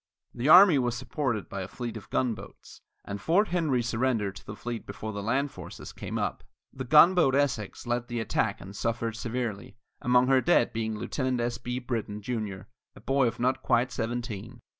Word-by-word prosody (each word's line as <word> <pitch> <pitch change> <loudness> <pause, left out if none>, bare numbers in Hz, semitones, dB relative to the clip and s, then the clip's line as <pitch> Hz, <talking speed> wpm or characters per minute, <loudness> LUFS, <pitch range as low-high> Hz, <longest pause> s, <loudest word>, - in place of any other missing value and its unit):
The 125 +4 -1
army 180 -3 +9
was 120 -1 0
supported 125 -3 -2
by 100 - -5
a 95 - -5
fleet 120 +3 -6
of 110 - -9
gunboats, 120 -4 -4 0.2
and 100 +1 -5
Fort 195 +6 +3
Henry 155 -9 +1
surrendered 115 -4 0
to - - -13
the 105 - -6
fleet 120 +1 -6
before 110 +2 -6
the 100 - -4
land 130 +7 0
forces - - -9
came - - -5
up. - - -2 0.3
The 130 -1 -5
gunboat 155 +1 +6
Essex 130 -9 -1
led 120 0 -1
the 120 -1 -3
attack 110 - 0
and 95 +2 -10
suffered 115 0 -2
severely, 120 -1 -4 0.2
among 125 0 +4
her 130 0 +4
dead 175 -7 +3
being 110 -1 -2
Lieutenant 130 +2 -2
S. 120 0 -2
B. 125 +1 -4
Brittan, 115 -4 -3
Jr., 105 -5 -3 0.3
a - - -14
boy 135 -2 +2
of 115 - -4
not 125 +2 +1
quite 120 +2 +2
seventeen. 115 0 -4
120 Hz, 185 wpm, -28 LUFS, 110-130 Hz, 0.3 s, army